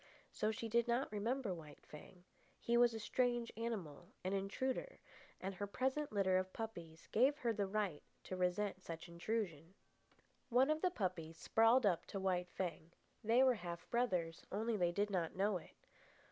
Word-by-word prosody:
So 215 - 0
she 225 +1 -3
did 235 +1 +2
not 240 +2 +1
remember 220 +1 -1
White 155 -4 -11
Fang. 175 +4 -12 0.4
He 235 - +1
was 240 -1 +5
a - - -3
strange 240 +1 0
animal, 190 -9 -4 0.2
an 185 +1 -1
intruder; 255 - -2 0.4
and 195 +1 -3
her 205 +2 -4
present 265 +7 -1
litter 190 -3 +3
of 185 0 -3
puppies 170 -8 -6
gave 265 +6 +4
her 235 -6 0
the 200 -2 0
right 195 -6 -1 0.2
to 185 - -4
resent 185 +2 0
such 165 -1 -7
intrusion. 170 -2 -3 0.7
One 260 +4 +5
of 310 0 0
the 365 - +3
puppies 180 - -3
sprawled 225 +7 +4
up 180 -5 +2
to 195 - -4
White 180 -2 0
Fang. 170 -3 -4 0.3
They 230 +4 +5
were 260 -1 +6
half 175 -5 -6
brothers, 180 -9 0
only 220 +3 0
they 175 -4 +2
did 205 +3 0
not 175 -4 -1
know 195 +1 +2
it. 170 - -15
205 Hz, 175 wpm, -39 LUFS, 180-235 Hz, 0.7 s, were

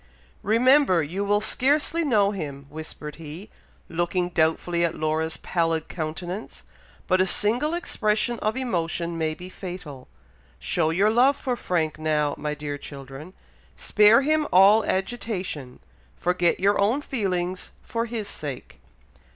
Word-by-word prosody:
"Remember 230 - +4
you 180 +7 -3
will 205 +1 +2
scarcely 290 +8 +1
know 210 -9 +3
him," 145 -8 -6
whispered 150 -1 -8
he, 165 +5 -9 0.4
looking 175 +1 -1
doubtfully 170 +1 +1
at 170 -1 0
Laura's 160 +1 -1
pallid 165 -2 -1
countenance; 175 +5 -5 0.4
"but 185 0 +3
a 190 - +2
single 245 - +2
expression 230 -7 0
of 215 +3 -1
emotion 170 -8 -2
may 160 -1 -1
be 180 - -9
fatal. 175 -8 -8 0.5
Show 160 -3 0
your 195 +6 +3
love 260 +5 +4
for 255 -3 -2
Frank 160 -8 -1
now, 150 -2 +1
my 150 0 -2
dear 145 -1 -5
children. 140 +5 -10 0.4
Spare 210 - +5
him 310 +1 +2
all 200 +4 +6
agitation, 190 - -3 0.4
forget 180 -1 +1
your 200 +2 +3
own 235 +9 +2
feelings 185 -8 -2
for 230 0 -3
his 220 -3 -4
sake." 145 -9 -7
180 Hz, 135 wpm, -25 LUFS, 160-215 Hz, 0.5 s, all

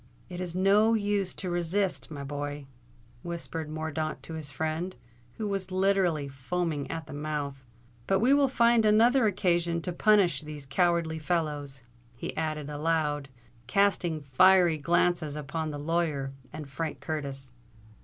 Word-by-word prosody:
"It 180 0 -5
is 175 -1 -5
no 205 +4 +4
use 205 -3 0
to 185 -2 -4
resist, 175 +3 -1
my 145 -3 -6
boy," 145 0 -5 0.6
whispered 165 -2 -5
Mordaunt 155 0 -3
to 165 - -7
his 155 -2 -5
friend, 160 +5 -3 0.4
who 215 - -2
was 195 -2 -2
literally 185 -5 +2
foaming 145 +2 -3
at 160 -1 -4
the 145 - -10
mouth. 145 -2 -4 0.4
"But 195 - +3
we 250 +6 +4
will 285 -1 +5
find 235 -3 +4
another 225 +3 +5
occasion 175 -4 +1
to 180 - -2
punish 200 -2 +3
these 150 -2 -8
cowardly 165 +2 +1
fellows," 150 -5 -2 0.3
he - - -5
added 155 -2 -2
aloud, 150 -1 -1 0.4
casting 175 -1 +2
fiery 170 +4 +5
glances 170 -1 +1
upon 155 +2 -3
the 145 - -5
lawyer 150 -3 -1 0.2
and 150 -1 -7
Frank 155 +3 -4
Curtis. 140 -4 -5
165 Hz, 145 wpm, -28 LUFS, 150-185 Hz, 0.6 s, will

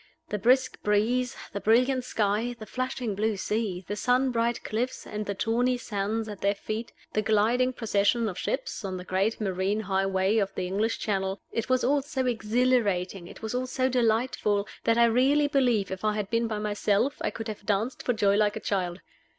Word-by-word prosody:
The 210 - -2
brisk 255 +5 +2
breeze, 235 +5 +1 0.2
the 200 - -2
brilliant 250 +4 +3
sky, 220 +1 0
the 220 - -8
flashing 255 -2 -3
blue 215 +1 0
sea, 195 -3 -2
the 205 - -2
sun 250 +5 +2
bright 235 0 0
cliffs 240 +4 -3
and 210 0 -5
the 200 - -2
tawny 245 +5 +1
sands 220 -1 -2
at 205 -2 -8
their 200 +1 +2
feet, 220 +3 -5 0.2
the 215 - +2
gliding 220 +4 +2
procession 225 -1 +1
of 190 - -4
ships - - -3
on 190 -2 -3
the 180 - -7
great 190 +4 0
marine 195 +1 0
highway 195 +1 +1
of 195 -2 -1
the 185 - -2
English 205 +5 0
Channel 195 -1 -1
it 230 +2 -3
was 255 0 +2
all 280 +3 +3
so 270 -2 -2
exhilarating, 215 -6 +1
it - - -13
was 220 - -3
all 255 +1 -1
so 260 0 0
delightful, 225 -4 +1 0.2
that 230 0 +3
I 235 - +6
really 265 +6 +3
believe 245 -9 +2
if 190 +1 -5
I 215 -1 +1
had 210 -2 -3
been 230 0 +1
by 220 -1 -3
myself 210 +6 0
I - - 0
could 225 0 -6
have 210 -2 -7
danced 215 +5 0
for 245 - 0
joy 200 -3 +3
like 210 -1 +2
a - - -3
child. 185 -4 -2
220 Hz, 200 wpm, -27 LUFS, 200-245 Hz, 0.2 s, I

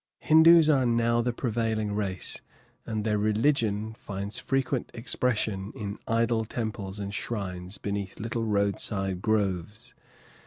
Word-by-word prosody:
Hindoos 160 +1 +7
are 135 -5 +4
now 115 0 +2
the 120 +1 0
prevailing 110 -3 -1
race, 100 -3 -3 0.5
and 110 -2 -2
their 105 -1 +1
religion 110 -1 +1
finds 100 -1 -6
frequent 135 -1 -1
expression 110 -4 -1
in 105 -1 -5
idol 115 0 +2
temples 105 -3 -4
and 100 0 -4
shrines 95 -4 -4
beneath 100 -1 -4
little 115 +1 -2
roadside 100 -2 0
groves. 105 -2 -1
110 Hz, 120 wpm, -28 LUFS, 100-115 Hz, 0.5 s, Hindoos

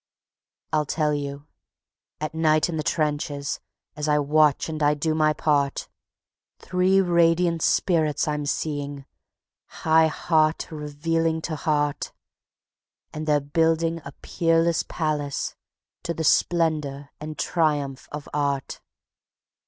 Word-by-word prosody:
I'll 150 -2 +1
tell 150 0 0
you.... 140 0 -4 0.7
At 155 0 -4
night 155 0 +2
in 165 - -3
the - - 0
trenches, 145 -1 -1 0.4
as 150 0 -3
I 150 0 +3
watch 150 0 +3
and 155 -1 -5
I 150 0 +3
do 155 +2 0
my 155 -1 +3
part, 145 -2 0 0.7
Three 185 +1 +2
radiant 170 -2 +3
spirits 160 -5 +2
I'm 150 -1 -2
seeing, 145 -2 -3 0.8
high 160 0 +5
heart 155 0 +1
revealing 160 +2 -1
to 160 - -3
heart, 150 -2 -1 1.0
And 155 0 -5
they're 150 -1 +4
building 165 +3 +1
a 140 - -9
peerless 165 0 +2
palace 150 -3 -2 0.5
to 170 - -3
the 160 - -3
splendor 150 -4 +1
and 155 0 -7
triumph 145 -5 -1
of 150 -1 -7
Art. 140 -2 -2
155 Hz, 120 wpm, -24 LUFS, 145-165 Hz, 1.0 s, high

